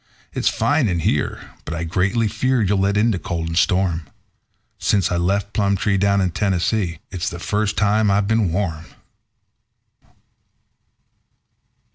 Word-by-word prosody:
It's -, -, +1 dB
fine 145 Hz, -4 st, +1 dB
in 85 Hz, -4 st, -1 dB
here, -, -, -1 dB
but 80 Hz, -, -5 dB
I 85 Hz, -, -3 dB
greatly 100 Hz, +7 st, +1 dB
fear 120 Hz, +3 st, 0 dB
you'll 100 Hz, 0 st, +1 dB
let 100 Hz, +1 st, +1 dB
in 115 Hz, +3 st, +3 dB
the 95 Hz, -, -2 dB
cold 80 Hz, 0 st, -3 dB
and 80 Hz, -, -4 dB
storm 90 Hz, -3 st, +1 dB, 0.7 s
Since 95 Hz, -4 st, +1 dB
I 90 Hz, -, +1 dB
left 100 Hz, +4 st, 0 dB
Plumtree, 100 Hz, -1 st, +1 dB
down 100 Hz, 0 st, +2 dB
in 90 Hz, -2 st, 0 dB
Tennessee, 95 Hz, -1 st, 0 dB
it's 95 Hz, +2 st, -2 dB
the 85 Hz, -, -7 dB
first 105 Hz, +3 st, -1 dB
time 105 Hz, 0 st, +2 dB
I've 100 Hz, 0 st, +2 dB
been 110 Hz, -5 st, +1 dB
warm." 85 Hz, -3 st, -2 dB
100 Hz, 145 wpm, -21 LUFS, 85-105 Hz, 0.7 s, in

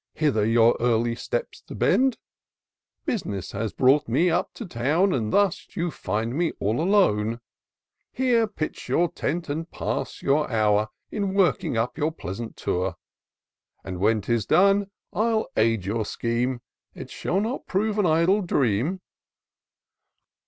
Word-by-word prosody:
Hither 140 Hz, -9 st, +1 dB
your 115 Hz, +1 st, +5 dB
early 115 Hz, 0 st, +1 dB
steps -, -, -4 dB
to -, -, -8 dB
bend; 260 Hz, -2 st, +2 dB, 0.9 s
Bus'ness 140 Hz, -, -3 dB
has 105 Hz, +1 st, -3 dB
brought 140 Hz, +3 st, +3 dB
me 175 Hz, +1 st, +2 dB
up 175 Hz, +2 st, 0 dB
to 230 Hz, -, -6 dB
town, 165 Hz, +7 st, +1 dB
And 110 Hz, -4 st, -1 dB
thus 200 Hz, -2 st, +2 dB
you 170 Hz, 0 st, -1 dB
find 110 Hz, +2 st, -3 dB
me 170 Hz, +1 st, 0 dB
all 110 Hz, +8 st, 0 dB
alone: 115 Hz, -, +2 dB, 0.7 s
Here 245 Hz, -3 st, +2 dB
pitch 160 Hz, -7 st, -5 dB
your 175 Hz, 0 st, +2 dB
tent 170 Hz, +3 st, -3 dB
and 160 Hz, +3 st, -4 dB
pass -, -, -4 dB
your 145 Hz, +2 st, +2 dB
hour 105 Hz, -2 st, +2 dB, 0.2 s
In 200 Hz, -2 st, -2 dB
working 175 Hz, -, +2 dB
up 120 Hz, +7 st, -1 dB
your 155 Hz, +1 st, +1 dB
pleasant 115 Hz, -, -7 dB
Tour; 90 Hz, 0 st, -1 dB, 0.9 s
And, 90 Hz, -1 st, -6 dB
when 110 Hz, +2 st, +2 dB
'tis 115 Hz, +1 st, -1 dB
done, 195 Hz, +4 st, +4 dB, 0.2 s
I'll 220 Hz, 0 st, +1 dB
aid 110 Hz, -3 st, +2 dB
your 110 Hz, +3 st, -1 dB
scheme 120 Hz, +3 st, -2 dB, 0.2 s
— -, -, -57 dB
It -, -, -9 dB
shall 190 Hz, -, -1 dB
not 225 Hz, +6 st, -3 dB
prove 210 Hz, +2 st, 0 dB
an 195 Hz, -, +3 dB
idle 170 Hz, +6 st, +3 dB
dream." 145 Hz, -, 0 dB
145 Hz, 145 wpm, -25 LUFS, -, 0.9 s, your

